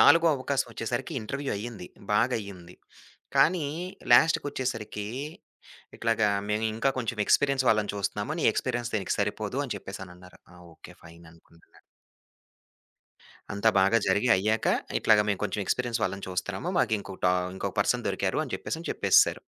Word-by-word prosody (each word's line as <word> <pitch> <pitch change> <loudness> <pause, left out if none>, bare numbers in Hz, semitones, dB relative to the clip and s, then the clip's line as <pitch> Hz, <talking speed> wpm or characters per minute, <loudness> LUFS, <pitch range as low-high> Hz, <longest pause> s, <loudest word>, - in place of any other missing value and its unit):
నాలుగో 165 +3 +7
అవకాశం 135 +1 -1
వచ్చేసరికి 120 +3 -4
ఇంటర్వ్యూ 140 +6 -4
అయ్యింది 105 -4 -7 0.3
బాగయ్యింది. 100 -6 -1 0.6
కానీ 165 -2 +4 0.5
లాస్ట్‌కొచ్చేసరికి 120 -7 +2 0.9
ఇట్లాగ 115 -1 0 0.3
మేము 105 +1 0
ఇంకా 135 +5 +1
కొంచెం 115 -2 -3
ఎక్స్‌పీరియన్స్ 140 -2 +3
వాళ్ళని 105 -2 +2
చూస్తున్నాము 100 - -2
నీ - - -1
ఎక్స్‌పీరియన్స్ 120 0 -2
దీనికి 95 - -1
సరిపోదు - - -2
అని - - -4
చెప్పేసనన్నారు. 90 -1 -10
ఆ! - - -16 0.2
ఓకే. - - -13
ఫైననుకుంటున్నా. 85 0 -18 1.7
అంతా 100 +2 +2
బాగా 100 +4 +4
జరిగి 100 +6 +2
అయ్యాక 110 +4 0 0.3
ఇట్లాగ 105 -1 +5
మేము 100 -2 0
కొంచెం 105 - -2
ఎక్స్‌పీరియన్స్ 120 0 -1
వాళ్ళని 100 -1 -2
చూస్తున్నాము 95 - -3
మాకు 110 -3 +2
ఇంకోటా 95 -2 -1 0.2
ఇంకొక 95 - -4
పర్సన్ - - +1
దొరికారు - - -1
అని - - -9
చెప్పేసని - - -5
చెప్పేసేశారు. - - +4
110 Hz, 130 wpm, -27 LUFS, 95-125 Hz, 1.7 s, నాలుగో